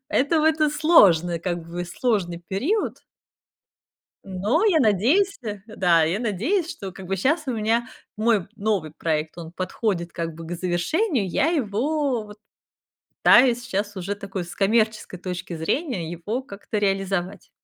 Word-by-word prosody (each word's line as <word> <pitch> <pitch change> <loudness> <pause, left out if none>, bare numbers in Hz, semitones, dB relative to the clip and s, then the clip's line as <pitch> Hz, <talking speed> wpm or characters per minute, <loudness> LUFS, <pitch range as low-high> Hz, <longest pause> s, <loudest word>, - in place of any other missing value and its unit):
Это 290 +5 +2
вот 315 0 +2
и 305 -1 +4
сложно, 185 - +5
как 175 -1 -3
бы, 175 +1 -4
сложный 175 -3 -1
период. 305 - -1 1.3
Но 200 - 0
я 355 -7 +4
надеюсь, 260 - +3
э 210 -2 -4
Да, 180 -6 +3
я 170 +7 0
надеюсь, 255 - 0
что, 195 -2 -7
как 190 -2 -10
бы, 195 - 0
щас 305 - +1
у - - 0
меня 230 +1 0 0.3
мой 215 -4 +1
новый 200 -7 -1
проект, 155 0 -2
он 165 -1 -8
подходит, 185 -1 -2
как 165 -2 -4
бы, 165 0 -9
к 175 - -4
завершению. 195 - 0
Я 290 - +1
его 275 -2 0
вот 210 0 -12 0.9
пытаюсь 245 -1 +6
сейчас 205 -3 -3
уже 190 +2 -3
такой 195 -2 -5
с 170 - -10
коммерческой 215 -2 +1
точки 180 -2 -5
зрения 175 - -2
его 205 +9 -3
как-то 205 -2 -6
реализовать. 195 -2 -1
205 Hz, 150 wpm, -24 LUFS, 175-250 Hz, 1.3 s, пытаюсь